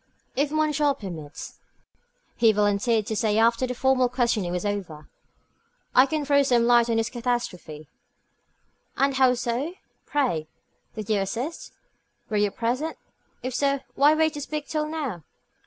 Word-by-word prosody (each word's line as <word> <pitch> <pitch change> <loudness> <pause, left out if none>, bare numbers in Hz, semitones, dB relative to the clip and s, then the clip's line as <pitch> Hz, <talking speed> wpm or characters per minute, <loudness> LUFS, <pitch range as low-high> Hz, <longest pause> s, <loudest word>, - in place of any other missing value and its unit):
"If 285 +2 +1
monsieur 300 -2 +2
permits," 160 -7 -8 0.8
he 230 -2 +5
volunteered 210 +2 +1
to 220 0 -3
say 215 0 +1
after 230 +3 +3
the 250 - -4
formal 255 0 +2
questioning 235 -7 0
was 180 +2 -2
over, 185 -7 -4 0.9
"I 260 +2 +6
can 305 0 -2
throw 280 0 +4
some 245 -4 +3
light 240 -1 +4
on 230 - +1
this 225 -1 0
catastrophe." 230 - -3 1.1
"And 275 0 +2
how 260 -1 +4
so, 250 +8 -2 0.3
pray? 245 - 0 0.5
Did 215 -2 -6
you 210 - +3
assist? 240 - -4 0.6
Were 210 - +1
you 205 0 +3
present? 250 +10 -2 0.5
If 255 0 -3
so, 275 +1 +1
why 295 +2 +5
wait 315 0 +2
to 295 - -5
speak 295 0 -4
till 305 -1 -1
now?" 290 - -4
245 Hz, 150 wpm, -25 LUFS, 210-280 Hz, 1.1 s, I